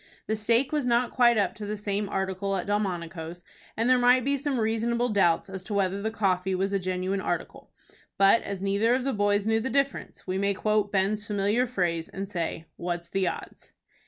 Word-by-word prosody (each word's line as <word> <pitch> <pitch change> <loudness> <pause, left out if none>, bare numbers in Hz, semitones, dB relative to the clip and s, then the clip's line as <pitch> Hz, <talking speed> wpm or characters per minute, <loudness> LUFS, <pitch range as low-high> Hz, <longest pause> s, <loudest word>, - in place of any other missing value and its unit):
The 220 - -1
steak 230 +4 +1
was 295 -4 0
not 240 0 +2
quite 240 -2 +4
up 205 - +1
to 210 - -7
the 210 +1 -3
same 205 0 -2
article 190 0 -2
at 185 - -2
Delmonico's, 175 -4 -3 0.3
and 230 +2 +1
there 255 0 +5
might 250 0 +4
be 280 +1 +2
some 280 -2 -1
reasonable 230 +2 0
doubts 195 -4 +2
as 190 -1 -7
to 205 - -3
whether 195 0 0
the 220 - -1
coffee 190 -3 0
was 195 +2 -1
a 195 - +2
genuine 185 +1 -2
article; - - -4 0.5
but 200 +4 +5
as 195 -1 -5
neither 205 +5 +2
of 260 - -1
the 270 0 -1
boys 205 0 +1
knew 220 0 +2
the 245 +4 -2
difference, 275 0 -1
we 185 0 -2
may 200 0 +1
quote 210 0 +1
Ben's 205 +2 0
familiar 210 +4 +1
phrase, 175 -8 -1
and 195 +1 -5
say, 170 -4 -3
"What's 170 -1 -4
the 195 0 0
odds?" - - -7
205 Hz, 205 wpm, -27 LUFS, 190-230 Hz, 0.5 s, there